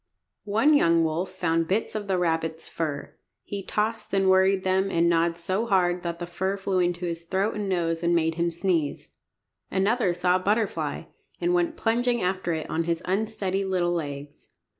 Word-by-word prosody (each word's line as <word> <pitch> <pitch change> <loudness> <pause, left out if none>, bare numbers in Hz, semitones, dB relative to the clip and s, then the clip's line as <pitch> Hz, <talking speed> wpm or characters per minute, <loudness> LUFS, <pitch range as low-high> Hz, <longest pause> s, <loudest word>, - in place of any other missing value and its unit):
One 225 +9 +4
young 170 - +4
wolf 160 +4 -1
found 165 -3 0
bits 205 +5 0
of 210 -2 -4
the 190 -1 +1
rabbit's 165 -2 -1
fur. 150 -3 -4 0.3
He 200 -1 -5
tossed 215 +1 -2
and 195 -1 +4
worried 190 0 +4
them, 190 +1 +1
and 170 -2 +2
gnawed 170 0 +2
so 190 +6 -2
hard 180 -3 +2
that 170 -1 -4
the 175 - -5
fur 190 +3 -2
flew 195 -1 -1
in 175 -1 +2
his 170 -1 -5
throat 190 +4 0
and 205 -2 -3
nose 165 -3 0
and 170 0 +2
made 165 -1 +2
him 170 +1 0
sneeze. 170 -3 -1 0.6
Another 200 +1 +1
saw 180 +1 +2
a - - -4
butterfly, 210 +3 -1 0.4
and 350 +1 +1
went 340 -2 +1
plunging 240 +1 +1
after 185 -2 -1
it 160 -2 -3
on 165 +1 -1
his 170 0 -1
unsteady 195 0 -1
little 185 -2 0
legs. 145 -3 -5
185 Hz, 185 wpm, -26 LUFS, 170-200 Hz, 0.6 s, One